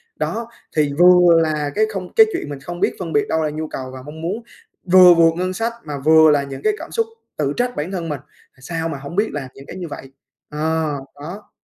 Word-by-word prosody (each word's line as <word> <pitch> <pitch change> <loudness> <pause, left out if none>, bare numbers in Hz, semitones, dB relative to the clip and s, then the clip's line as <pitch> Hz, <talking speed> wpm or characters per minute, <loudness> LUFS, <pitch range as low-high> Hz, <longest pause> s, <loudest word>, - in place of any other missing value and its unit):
Đó, 230 +1 -3 0.3
thì 150 -2 +2
vừa 180 -1 +7
là 150 -2 -1
cái 215 +1 +3
không 185 -2 -6
cái 445 - +8
chuyện 345 - -4
mình 140 - -6
không 175 +5 -7
biết - - +1
phân 165 -3 -5
biệt 145 - +2
đâu 160 0 +1
là 155 - 0
nhu 155 +1 -4
cầu 130 -2 -6
và 130 - -8
mong 155 +2 -9
muốn, 200 +8 -3 0.5
vừa 180 -1 +9
vượt 165 -1 +5
ngân 185 +1 -1
sách, 230 +4 -2
mà 145 -2 -5
vừa 160 -1 +7
là 145 -1 +2
những 135 -1 -8
cái 425 - +3
cảm - - -9
xúc 455 -1 +1 0.3
tự 145 -1 0
trách 245 0 -1
bản 160 +6 -3
thân 170 -3 -4
mình: 145 -2 -3 0.3
"À, - - -27
sao 165 +3 -3
mà 145 - -4
hổng 140 +5 -8
biết 210 +3 +1
là 135 -3 -5
những 135 - -12
cái - - -9
như 180 -2 -5
vậy?" 135 -2 -9 0.4
Ờ, 155 -1 -1 0.2
đó. 170 +9 -9
160 Hz, 250 wpm, -20 LUFS, 145-180 Hz, 0.5 s, vừa